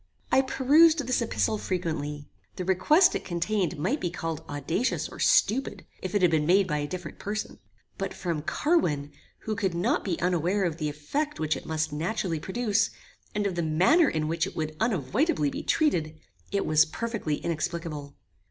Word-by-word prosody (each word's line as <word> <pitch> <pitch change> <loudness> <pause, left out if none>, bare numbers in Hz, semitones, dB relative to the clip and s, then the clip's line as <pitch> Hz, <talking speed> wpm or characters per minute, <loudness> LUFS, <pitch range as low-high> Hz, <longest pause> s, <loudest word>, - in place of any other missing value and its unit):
I 265 - +6
perused 290 +4 +4
this 255 -1 +1
epistle 220 -1 0
frequently. 150 -5 -3 0.3
The 180 - -4
request 300 - +4
it - - -3
contained 175 0 -1
might 200 - 0
be 175 - 0
called 165 -2 -4
audacious 155 - -1
or - - -12
stupid, 260 - +2 0.2
if 185 +1 -4
it 200 - +2
had 175 - +5
been 155 -2 +1
made 190 +3 +5
by 150 -3 -1
a 145 - -2
different 180 +3 -7
person; 210 +1 -4 0.4
but 195 0 -2
from 170 -4 -3
Carwin, 155 - 0 0.3
who 215 - -3
could 190 -5 -1
not 175 - +1
be 180 -5 -2
unaware 180 +3 +1
of 165 -3 -1
the 155 -3 -1
effect 280 - -3
which 155 -1 0
it - - -8
must 155 -1 -1
naturally 165 +1 -2
produce, 220 +4 0 0.5
and 210 -1 0
of 200 - 0
the 175 - -1
manner 185 - +4
in 155 -1 -1
which 165 +1 0
it - - -9
would 155 -1 -3
unavoidably 210 - +1
be - - -4
treated, 160 - 0 0.3
it 200 0 0
was 155 0 +5
perfectly 225 -4 -3
inexplicable. 160 -3 -4
180 Hz, 180 wpm, -27 LUFS, 155-220 Hz, 0.5 s, I